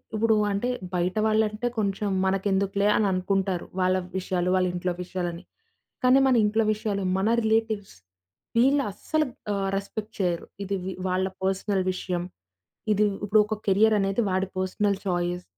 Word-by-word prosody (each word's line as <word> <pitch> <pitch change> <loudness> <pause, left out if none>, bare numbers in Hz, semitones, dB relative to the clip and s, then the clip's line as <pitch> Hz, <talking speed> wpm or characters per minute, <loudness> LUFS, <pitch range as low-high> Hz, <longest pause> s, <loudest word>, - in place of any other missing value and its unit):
ఇప్పుడు 220 +1 +3 0.2
అంటే 200 +5 -1 0.2
బయట 180 +2 0
వాళ్ళంటే 215 +1 +1
కొంచెం 200 0 -1 0.2
మనకెందుకులే 195 +1 +1
అని 215 - +2
అనుకుంటారు. 185 -1 0 0.2
వాళ్ళ 185 0 +3 0.2
విషయాలు, 180 -1 -1
వాళ్ళ 185 -1 +2
ఇంట్లో 180 0 -1
విషయాలు 180 -1 -3
అని. 170 +2 -10 0.6
కానీ 255 +2 +6
మన 260 - +4
ఇంట్లో 220 +2 +2
విషయాలు 205 -2 -2 0.2
మన 195 - +1
రిలేటివ్స్ 220 -2 0 0.6
వీళ్ళు 275 +4 +4
అస్సలుగా 300 +6 -2 0.2
ఆహ్, 195 -1 -1
రెస్పెక్ట్ 210 +2 -5
చేయరు. 175 -3 -1 0.2
ఇది 200 +1 -2
వి 190 - -3 0.2
వాళ్ళ 185 +1 +1 0.2
పర్సనల్ 190 0 0
విషయం. 180 -1 -3 0.7
ఇది 210 +1 +3 0.2
ఇప్పుడు 210 +1 +4
ఒక 215 - -1
కెరియరనేది 205 +1 +3
వాడి 190 +1 0
పర్సనల్ 195 +2 0
చాయిస్. 175 -1 -1
195 Hz, 145 wpm, -26 LUFS, 185-215 Hz, 0.7 s, కానీ